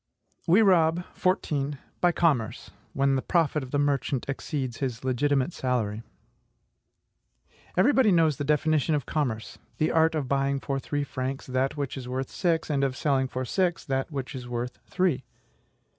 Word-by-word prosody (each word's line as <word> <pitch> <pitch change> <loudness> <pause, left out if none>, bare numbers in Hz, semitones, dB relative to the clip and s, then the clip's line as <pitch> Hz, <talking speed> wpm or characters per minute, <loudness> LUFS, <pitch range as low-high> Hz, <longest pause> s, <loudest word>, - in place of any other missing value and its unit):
We 190 +7 +6
rob, 175 -3 +4
14. 145 -6 0 0.2
By 175 - +5
commerce, 145 -11 0 0.2
when 140 0 +2
the 130 - 0
profit 160 -3 +1
of 130 - -7
the 145 - 0
merchant 140 -2 0
exceeds 135 -3 -3
his 130 -3 -3
legitimate 135 +4 +1
salary. 115 -5 -1 1.8
Everybody 255 +2 +5
knows 160 -5 +3
the - - -2
definition 150 +1 +2
of 145 - -2
commerce 120 -8 -2 0.2
THE 155 - +1
ART 160 0 +3
OF 145 -4 -1
BUYING 140 +1 +1
FOR 135 -1 -2
THREE 145 +2 -2
FRANCS 130 0 -4
THAT 130 +3 -1
WHICH 140 -1 -3
IS 125 -2 -6
WORTH 130 +1 -3
SIX, 165 -4 0
AND 140 -1 +1
OF 130 -2 0
SELLING 135 -3 +1
FOR 130 0 -4
SIX 175 +5 0
THAT 135 +1 -1
WHICH 135 -2 -4
IS 125 -2 -7
WORTH 120 0 -4
THREE. 175 -8 +1
140 Hz, 160 wpm, -27 LUFS, 130-160 Hz, 1.8 s, We